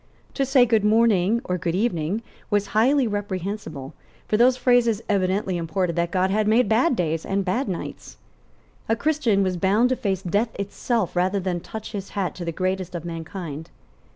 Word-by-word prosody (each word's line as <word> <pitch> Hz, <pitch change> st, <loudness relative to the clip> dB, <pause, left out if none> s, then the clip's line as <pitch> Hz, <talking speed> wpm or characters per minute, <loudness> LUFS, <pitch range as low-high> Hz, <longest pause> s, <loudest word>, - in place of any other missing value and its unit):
To 275 Hz, -2 st, 0 dB
say 265 Hz, -2 st, +5 dB
Good 225 Hz, -3 st, +2 dB
morning 215 Hz, -1 st, +3 dB
or 180 Hz, -5 st, -2 dB
Good 170 Hz, 0 st, -1 dB
evening 195 Hz, -1 st, -1 dB, 0.3 s
was 205 Hz, -1 st, +1 dB
highly 260 Hz, +5 st, +4 dB
reprehensible, 195 Hz, -, -4 dB, 0.3 s
for -, -, +1 dB
those 250 Hz, +3 st, +4 dB
phrases 240 Hz, -4 st, +2 dB
evidently 190 Hz, -1 st, 0 dB
imported 170 Hz, +1 st, -1 dB
that 170 Hz, 0 st, 0 dB
God 185 Hz, +1 st, +1 dB
had 210 Hz, +1 st, +1 dB
made 225 Hz, +2 st, +4 dB
bad 245 Hz, +7 st, +3 dB
days 160 Hz, -4 st, -1 dB
and 195 Hz, 0 st, -1 dB
bad 205 Hz, +6 st, -1 dB
nights. 180 Hz, -, -6 dB, 0.7 s
A 225 Hz, -, +3 dB
Christian 240 Hz, -7 st, +1 dB
was 185 Hz, -1 st, -1 dB
bound 205 Hz, +7 st, +3 dB
to 255 Hz, -, +1 dB
face 195 Hz, -5 st, -2 dB
death 205 Hz, +6 st, 0 dB
itself 200 Hz, 0 st, -2 dB
rather 185 Hz, +3 st, +1 dB
than 180 Hz, -2 st, -2 dB
touch 220 Hz, +5 st, -8 dB
his 200 Hz, -3 st, -5 dB
hat 190 Hz, -3 st, -1 dB
to 180 Hz, -, -7 dB
the 170 Hz, -, -2 dB
greatest 185 Hz, +1 st, -2 dB
of 170 Hz, -1 st, -5 dB
mankind. 165 Hz, -2 st, -6 dB
200 Hz, 180 wpm, -23 LUFS, 180-225 Hz, 0.7 s, say